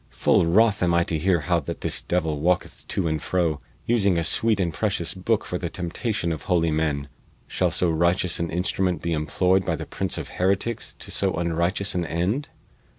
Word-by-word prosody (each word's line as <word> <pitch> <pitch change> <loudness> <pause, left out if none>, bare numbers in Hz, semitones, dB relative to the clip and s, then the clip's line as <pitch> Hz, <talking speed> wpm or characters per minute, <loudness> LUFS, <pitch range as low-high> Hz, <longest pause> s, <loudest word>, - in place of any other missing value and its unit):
Full 85 - +2
wroth 105 +4 +4
am 85 -1 +3
I 85 - +4
to 80 - -2
hear 90 0 +2
how 85 +3 +1
that 70 - -6
this - - -1
devil 80 -4 -1
walketh 90 +3 -1
to 90 - -1
and 80 -1 -1
fro, 80 -6 0 0.2
using 100 -6 +2
a 85 - +1
sweet 110 +5 +1
and 85 -4 0
precious 90 -3 -1
booke 105 +4 0
for 90 - -3
the 85 - -3
temptation 90 +2 -2
of 80 - -3
holy 85 -3 +3
men. 75 -3 0 0.4
Shall - - 0
so 90 - +1
righteous 85 +2 +1
an 85 0 -1
instrument 90 0 -1
be 85 -1 0
employed 90 +5 +2
by - - 0
the - - -6
prince - - -3
of - - -5
heretics 100 +5 -1
to - - -9
so - - 0
unrighteous 85 +4 0
an 90 -2 -1
end?" 90 - -1
85 Hz, 200 wpm, -24 LUFS, 80-95 Hz, 0.4 s, wroth